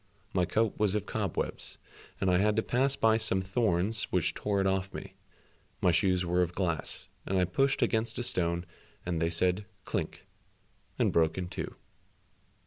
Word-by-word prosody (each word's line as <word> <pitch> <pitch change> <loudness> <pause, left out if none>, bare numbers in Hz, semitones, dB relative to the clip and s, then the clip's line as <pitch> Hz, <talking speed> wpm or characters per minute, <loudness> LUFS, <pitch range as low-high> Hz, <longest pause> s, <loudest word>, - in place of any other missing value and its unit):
My 90 -2 +3
coat 110 +3 0
was 105 -2 +3
of 105 - -1
cobwebs, - - -3 0.4
and 95 -1 +2
I 90 - +4
had 105 +2 +3
to 110 - +2
pass 135 +3 +2
by 110 -3 +4
some 95 -4 +2
thorns 100 +1 +1
which 90 -4 +1
tore 100 -1 -1
it 95 - +2
off 95 0 0
me, - - -7 0.7
my 90 - +4
shoes 90 +1 +2
were 90 +1 +2
of 90 0 -1
glass, 85 -5 -2 0.2
and 95 - -1
I 90 - +4
pushed 135 +10 +2
against 110 0 0
a 120 - -1
stone 85 -5 0 0.4
and 85 -2 -1
they 80 - +2
said, 90 +4 +1 0.2
"Klink," - - -3 0.7
and - - +2
broke 80 0 +3
in 90 -1 -3
two. 90 - -5
95 Hz, 175 wpm, -30 LUFS, 90-110 Hz, 0.7 s, I